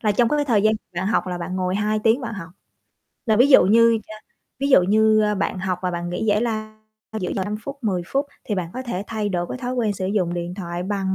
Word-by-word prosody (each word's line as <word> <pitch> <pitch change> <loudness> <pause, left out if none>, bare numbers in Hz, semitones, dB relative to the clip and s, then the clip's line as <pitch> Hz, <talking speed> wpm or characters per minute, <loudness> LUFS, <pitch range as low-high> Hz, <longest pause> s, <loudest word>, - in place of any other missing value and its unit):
là 210 -2 +2
trong 235 +2 +3
cái 295 -1 +1
thời 225 -7 +2
gian 215 0 +4 0.2
bạn 185 +2 -2
học 215 - +1
là 180 -1 -3
bạn 180 +2 -4
ngồi 185 0 -1
2 215 +1 0
tiếng 225 +5 +4
bạn 230 -3 -5
học, 180 -3 -8 0.8
là 220 - +3
ví 245 +5 +6
dụ 265 - +8
như, 230 +3 +5
ơ, 215 - -9 0.4
ví 275 +1 0
dụ 225 -9 +6
như 215 +2 +4
bạn 190 - -1
học 185 -1 -2
và 180 - 0
bạn 175 0 -4
nghỉ 180 +5 -3
giải 210 +1 +2
lao 215 -2 -3 0.4
giữa 180 - -2
giờ 190 - -1
5 210 +2 -3
phút, 280 0 -6
10 185 -5 0
phút 280 +1 -1 0.2
thì 210 - -2
bạn 180 -3 -3
có 255 - -4
thể 205 -6 -4
thay 215 -2 -2
đổi 175 -2 -1
cái - - -5
thói 250 0 -3
quen 225 -4 0
sử 185 -1 -4
dụng 185 -4 0
điện 175 +1 -4
thoại 175 -2 -5
bằng 195 -1 -1
210 Hz, 265 wpm, -22 LUFS, 185-225 Hz, 0.8 s, dụ